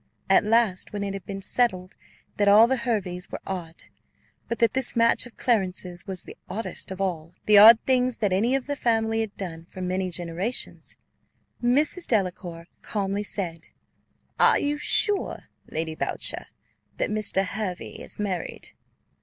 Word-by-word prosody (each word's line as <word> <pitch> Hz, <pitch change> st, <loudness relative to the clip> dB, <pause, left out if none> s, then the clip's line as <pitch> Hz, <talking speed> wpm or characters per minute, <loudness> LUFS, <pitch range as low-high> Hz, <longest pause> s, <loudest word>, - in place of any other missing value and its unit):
At 195 Hz, -, +6 dB
last, 215 Hz, -4 st, +1 dB
when 205 Hz, -1 st, -3 dB
it 200 Hz, -1 st, -3 dB
had 195 Hz, -3 st, -8 dB
been 195 Hz, -1 st, -6 dB
settled 185 Hz, -5 st, 0 dB, 0.4 s
that 205 Hz, -, +2 dB
all 210 Hz, +3 st, +8 dB
the 260 Hz, +3 st, +1 dB
Herveys 200 Hz, -8 st, -3 dB
were -, -, -5 dB
odd, 175 Hz, -4 st, -6 dB, 0.6 s
but 235 Hz, -, -3 dB
that 230 Hz, +1 st, +2 dB
this 265 Hz, -1 st, +1 dB
match 230 Hz, +1 st, +3 dB
of 240 Hz, -, -19 dB
Clarence's 190 Hz, -6 st, -1 dB
was 190 Hz, -2 st, -5 dB
the -, -, -11 dB
oddest 215 Hz, +5 st, -5 dB
of 190 Hz, 0 st, -7 dB
all 170 Hz, -4 st, -3 dB
the 210 Hz, -1 st, +7 dB
odd 220 Hz, +2 st, +10 dB
things 255 Hz, -2 st, +1 dB
that 205 Hz, -4 st, 0 dB
any 230 Hz, +8 st, +2 dB
of 270 Hz, -, -2 dB
the 285 Hz, -, -3 dB
family 225 Hz, -3 st, 0 dB
had 220 Hz, -2 st, -5 dB
done 170 Hz, -5 st, -7 dB
for 190 Hz, -, -11 dB
many 185 Hz, 0 st, -2 dB
generations, 175 Hz, +6 st, -4 dB, 0.6 s
Mrs. 290 Hz, +8 st, +1 dB
Delacour 180 Hz, -5 st, -1 dB, 0.2 s
calmly 200 Hz, -1 st, -2 dB
said, 170 Hz, -5 st, -3 dB, 0.7 s
"Are -, -, +5 dB
you 295 Hz, 0 st, -1 dB
sure, 415 Hz, +5 st, +2 dB, 0.3 s
Lady 160 Hz, 0 st, -3 dB
Boucher, -, -, 0 dB, 0.5 s
that -, -, -1 dB
Mr. 210 Hz, -2 st, +2 dB
Hervey 195 Hz, -2 st, -5 dB
is -, -, -2 dB
married?" 195 Hz, -4 st, -4 dB
200 Hz, 160 wpm, -25 LUFS, 185-230 Hz, 0.7 s, odd